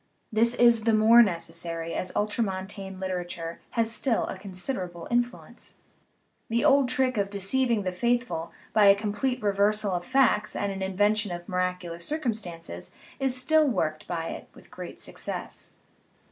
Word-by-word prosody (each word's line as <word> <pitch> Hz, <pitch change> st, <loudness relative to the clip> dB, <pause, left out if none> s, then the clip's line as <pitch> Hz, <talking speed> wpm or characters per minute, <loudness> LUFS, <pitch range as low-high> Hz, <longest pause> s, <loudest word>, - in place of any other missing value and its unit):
This 230 Hz, +2 st, +3 dB
is 235 Hz, -2 st, +4 dB
the 225 Hz, -1 st, +4 dB
more 225 Hz, +2 st, +7 dB
necessary 165 Hz, -3 st, -2 dB
as 185 Hz, -, -3 dB
ultramontane 195 Hz, -2 st, -2 dB
literature 175 Hz, -3 st, -4 dB, 0.2 s
has 230 Hz, -1 st, +3 dB
still 230 Hz, +2 st, +1 dB
a -, -, -5 dB
considerable 185 Hz, -3 st, -4 dB
influence. 240 Hz, 0 st, -3 dB, 0.7 s
The 235 Hz, +5 st, +1 dB
old 275 Hz, -3 st, +5 dB
trick 255 Hz, -2 st, +1 dB
of 200 Hz, -1 st, 0 dB
de 200 Hz, -, -5 dB
ceiving 230 Hz, +2 st, +1 dB
the 185 Hz, -, -1 dB
faithful 235 Hz, -4 st, -1 dB, 0.2 s
by 215 Hz, -2 st, +5 dB
a 200 Hz, 0 st, +8 dB
complete 215 Hz, +4 st, -2 dB
reversal 205 Hz, 0 st, +2 dB
of 175 Hz, -1 st, -2 dB
facts 255 Hz, -3 st, +2 dB
and 200 Hz, -1 st, -1 dB
an 195 Hz, 0 st, -6 dB
invention 205 Hz, +2 st, +1 dB
of 175 Hz, 0 st, -6 dB
miraculous 180 Hz, -2 st, -2 dB
circumstances 210 Hz, -, -3 dB, 0.2 s
is 265 Hz, -2 st, +3 dB
still 315 Hz, +3 st, +4 dB
work 160 Hz, -, -1 dB
ed -, -, -19 dB
by 165 Hz, -2 st, -3 dB
it -, -, -8 dB
with -, -, -16 dB
great -, -, -9 dB
success. -, -, -6 dB
205 Hz, 155 wpm, -27 LUFS, 180-235 Hz, 0.7 s, a